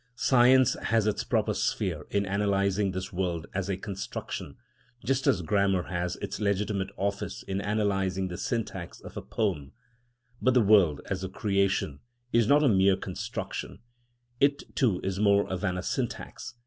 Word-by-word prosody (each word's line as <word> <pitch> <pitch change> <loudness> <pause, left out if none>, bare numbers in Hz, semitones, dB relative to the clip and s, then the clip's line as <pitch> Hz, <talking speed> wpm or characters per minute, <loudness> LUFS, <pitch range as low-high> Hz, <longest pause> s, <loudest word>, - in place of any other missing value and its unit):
Science 130 0 +5
has 110 -1 +2
its 105 - 0
proper - - +1
sphere - - -1
in 100 0 0
analysing 100 0 +1
this 95 +2 -5
world 90 -3 -2
as 95 0 -2
a 95 - -1
construction, 100 0 -6 0.5
just 135 +1 +1
as 90 - +3
grammar 95 +1 +2
has 90 0 -3
its 100 0 -4
legitimate 100 -1 0
office 100 +1 -3
in 95 0 -3
analysing 100 -2 0
the 90 - -5
syntax 100 -5 -4
of - - -11
a - - -4
poem. 85 -11 -2 0.7
But 130 0 +3
the 125 - +6
world, 100 -8 +4
as 95 -1 -2
a 95 - -3
creation, 100 -7 0 0.3
is 115 -2 +4
not 145 +3 +5
a - - +5
mere 95 -3 +4
construction; - - -5 0.6
it 140 +1 +1
too 110 -10 +2
is 95 0 -2
more 100 -1 +4
than 90 0 -1
a 90 - -4
syntax. 120 - -4
100 Hz, 160 wpm, -28 LUFS, 95-105 Hz, 0.7 s, the